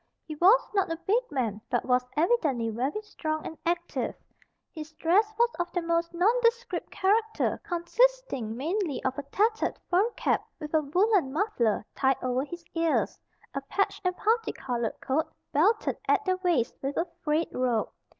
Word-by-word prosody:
He 310 - -6
was 390 +10 +5
not 390 -4 +1
a 330 - -2
big 415 +8 +1
man, 225 -6 -2
but 245 - 0
was 250 0 +2
evidently 305 - +2
very 270 - -2
strong 310 -6 -4
and 320 - -6
active. 345 0 -1 0.6
His 315 -1 -8
dress 385 +8 +2
was 475 0 +4
of 350 0 -1
the 355 - 0
most 335 0 0
nondescript 465 +6 +1
character, 440 +3 +1
consisting 350 - +1
mainly 330 +2 -2
of 260 +1 -1
a - - -4
tattered 440 +6 +1
fur 385 +6 +4
cap, - - +1 0.2
with 300 -1 -7
a 315 - +4
woolen 360 +1 +2
muffler 265 - 0
tied 270 -1 +2
over 255 +1 0
his 340 +3 -8
ears; 330 -1 +1 0.3
a 275 - -2
patched 395 +9 -1
and 365 -1 0
parti 450 +2 +1
colored 240 -4 -3
coat 295 +4 0 0.2
belted 410 +10 +2
at - - +3
the 370 -1 +1
waist 350 -10 +1
with 275 +1 -3
a 335 - +2 0.2
frayed 310 +1 0
rope. 245 -3 0
335 Hz, 165 wpm, -28 LUFS, 275-410 Hz, 0.6 s, was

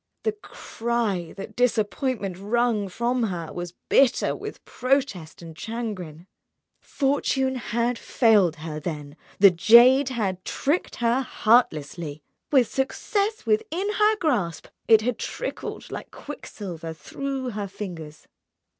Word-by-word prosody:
The 440 - +2
cry 230 - -3
that 200 +2 -8
disappointment 230 -3 0
wrung 215 -1 +1
from 240 +5 -1
her 175 -5 -4
was 175 0 -6
bitter 260 -2 +3
with - - -8
protest 255 - -1
and 165 -1 -10
chagrin. 185 -6 -5 0.6
Fortune 270 -1 0
had 235 -1 -1
failed 210 - +3
her, 155 -1 -6
then, 150 -3 -6 0.2
the 200 -1 +8
jade 240 +9 +7
had 195 -7 -2
tricked 300 +6 -1
her 240 +2 +1
heartlessly. 160 - +1 0.3
With 260 -5 +5
success 405 - -1
within 420 -2 0
her 425 +1 +4
grasp, 240 - -1 0.2
it 220 -1 +7
had 230 0 -2
trickled - - -5
like - - -6
quicksilver 170 -5 -7
through 270 - -4
her 205 -2 -4
fingers. 170 -6 -8
225 Hz, 120 wpm, -25 LUFS, 175-260 Hz, 0.6 s, the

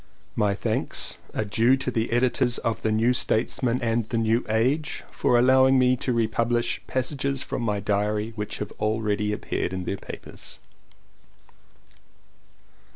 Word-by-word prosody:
My 100 -1 +1
thanks - - -1 0.2
are 110 - 0
due 115 +6 +3
to 130 -1 -3
the 115 -1 -1
editors 120 0 +2
of 115 -1 -2
The 110 - 0
New 115 +3 +3
Statesman 120 +1 0
and 115 -1 0
The 115 - -1
New 115 +2 +2
Age 130 +8 0
for 120 - +2
allowing 130 +2 +5
me 130 0 +4
to 125 - -1
republish 115 +1 0
passages 135 +1 -1
from - - -4
my 105 -3 0
diary 105 +2 -1
which 105 -1 -4
have 105 - -5
already 105 -1 0
appeared 100 -3 -3
in 95 -1 -3
their 100 - -3
papers. - - -10
115 Hz, 145 wpm, -25 LUFS, 105-125 Hz, 0.2 s, allowing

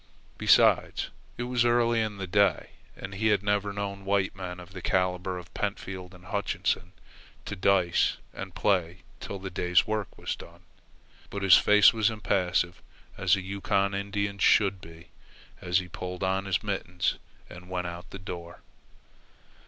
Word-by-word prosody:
Besides, - - +4 0.3
it 120 - -2
was 125 -1 +1
early 120 -1 +3
in 110 -2 -3
the 95 - -4
day, 95 -2 +2 0.3
and 95 - -8
he 110 +3 0
had 105 -2 +3
never 105 0 +1
known 100 -1 -4
white 95 -1 0
men 90 -1 -6
of 90 +1 -12
the 95 - -7
calibre 90 0 0
of 90 +1 -14
Pentfield 95 -2 -4
and 90 0 -16
Hutchinson 100 -2 -2 0.5
to - - -4
dice 90 -2 +2 0.2
and - - -8
play 90 -3 0 0.2
till 100 - -6
the 95 0 -7
day's 90 +1 +2
work 110 -2 -3
was - - -3
done. - - -14 0.7
But 100 -1 -5
his 95 -3 +8
face 105 +2 +6
was 110 -1 +2
impassive 90 -5 0 0.3
as 95 +1 +3
a 100 - -4
Yukon 100 +1 0
Indian's 100 0 -2
should 100 -4 +4
be, 80 +1 -13 0.5
as 90 -1 +1
he 90 -1 -2
pulled 90 +2 -6
on 95 +1 0
his 95 -1 0
mittens 90 -4 -2 0.3
and 90 +1 -12
went 90 -1 -2
out 85 0 -7
the - - -8
door. 85 -2 -8
95 Hz, 160 wpm, -28 LUFS, 90-100 Hz, 0.7 s, his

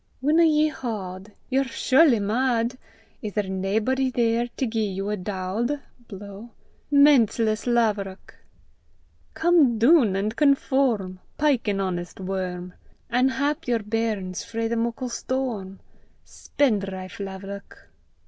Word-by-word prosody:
Winna 305 +5 +3
ye 310 -1 +4
haud? 205 -8 -6 0.2
Ye're 270 +1 +3
surely 265 -1 +3
mad! 235 +3 0 0.5
Is 210 -2 -5
there 210 - 0
naebody 210 +8 0
there 235 -1 +1
to 245 +2 -3
gie 220 -2 -1
ye 190 -1 -5
a 210 - -1
daud? 205 +8 -3 0.3
(blow) 200 +2 -10 0.4
Menseless 235 -6 +4
laverock! 210 -5 0 1.0
Come 320 -8 +4
doon 235 - +5
an' 200 +2 0
conform; 260 -8 +1 0.2
Pyke 285 -6 +1
an 200 -1 0
honest 175 -2 -4
worm, 185 -1 -4 0.4
An' 250 +2 +3
hap 285 +4 -2
yer 240 -1 +2
bairns 210 -4 -2
frae 225 0 -3
the 235 - -1
muckle 235 +2 -2
storm, 235 -7 -3 0.5
Spendrife 195 -9 -2
laverock! 195 +1 -9
225 Hz, 120 wpm, -24 LUFS, 195-260 Hz, 1.0 s, doon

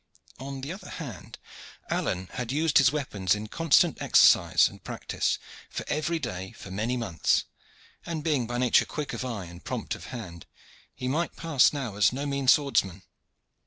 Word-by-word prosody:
On 135 +1 -6
the 140 +6 -4
other 195 - -10
hand, 125 - -8 0.5
Alleyne 95 0 -1
had 125 -1 -4
used 155 +2 +3
his 135 -2 +5
weapons 105 -11 0
in 105 +1 -5
constant 165 +7 +3
exercise - - +5
and - - -12
practice - - -2 0.4
on - - -1
every 160 +3 0
day 95 - -5
for 95 - -11
many 110 +6 -1
months, 105 -9 +1 0.6
and 160 -3 -4
being 145 -7 +1
by 120 +1 -3
nature 125 -1 +4
quick 150 -2 -5
of - - -4
eye 115 -7 -4
and 85 +1 -12
prompt - - -3
of - - -8
hand, 95 -10 -8 0.5
he 125 - -4
might 160 +6 -1
pass 160 -6 +3
now 130 -9 -4
as 100 -1 +5
no 135 +3 -4
mean 140 -2 -2
swordsman. 100 - +3
125 Hz, 170 wpm, -27 LUFS, 105-145 Hz, 0.6 s, his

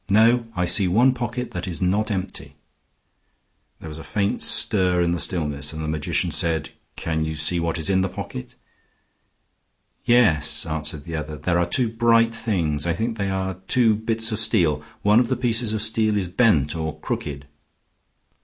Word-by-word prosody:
No; 115 +3 +4
I 90 - 0
see 90 +2 +3
one 120 +9 +4
pocket 125 0 -4
that 90 0 -5
is 90 - -3
not 100 +4 0
empty." 95 -3 -5 1.2
There - - -10
was 75 0 -8
a - - -9
faint 100 -1 -1
stir 90 -3 +2
in 85 -1 +1
the 85 - -1
stillness, 75 -4 -2
and 80 0 -5
the - - -3
magician 75 -1 -1
said, 80 -2 -1 0.2
"Can 80 -1 -2
you 80 0 -3
see 80 +3 +2
what 85 0 -2
is 80 - -4
in 95 -1 +2
the 95 - -1
pocket?" 65 - -8 1.5
"Yes," 90 -14 +3
answered 75 -2 -4
the 80 +1 -6
other; 75 0 -5
"there 85 +4 0
are 85 - +1
two 120 +7 +4
bright 115 0 +3
things. 85 -10 -1
I 85 - +1
think 110 +3 -3
they 100 0 -1
are 95 -1 -3
two 120 -4 +4
bits 115 +1 0
of 110 - -2
steel. 85 -9 +1 0.2
One 105 +2 +5
of 125 - +1
the - - -1
pieces 115 -2 +1
of 110 -1 -1
steel 110 -1 +1
is 95 -3 -1
bent 85 - +2
or 80 -1 -4
crooked." 70 -1 -5
95 Hz, 180 wpm, -22 LUFS, 80-110 Hz, 1.5 s, One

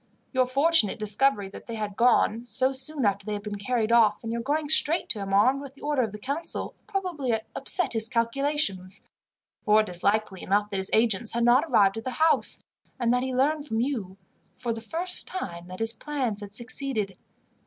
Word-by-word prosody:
Your 255 -1 +2
fortunate 275 - +3
discovery 210 0 +1
that - - -12
they 230 - -5
had 210 -2 -4
gone, 235 -1 +3
so 260 +2 +1
soon 270 0 -1
after 200 -1 +1
they 210 +1 -4
had 205 -1 -5
been 205 -1 -5
carried 230 +1 -1
off, 220 -3 +4
and 225 0 -4
your 235 - -2
going 295 +4 -1
straight 315 +4 +3
to 215 - 0
him 195 -1 -5
armed 255 +8 +3
with 275 -1 -10
the - - -16
order 290 -2 +1
of 225 -4 -2
the 210 - -7
council, 280 +9 -4
probably 345 - -2 0.2
upset 360 - +1
his 225 0 +2
calculations, 230 -6 -1 0.6
for 215 0 +5
it 215 - -5
is 175 -1 -9
likely 205 -2 0
enough 205 +2 0
that 195 - -2
his 190 0 -2
agents 225 0 +2
had 235 0 0
not 245 +6 +5
arrived 195 0 +4
at 225 - -5
the 255 - -3
house, 320 +5 +1 0.4
and 240 -1 +2
that 250 - +2
he 260 0 -2
learned 290 +4 0
from 225 -3 -1
you, 225 -8 -3 0.4
for 240 -2 -3
the 225 - -7
first 345 +10 0
time, 175 - -6
that 185 0 -8
his 225 +2 +3
plans 255 -6 -3
had 205 0 -6
succeeded. 235 -4 -2
230 Hz, 205 wpm, -26 LUFS, 205-275 Hz, 0.6 s, for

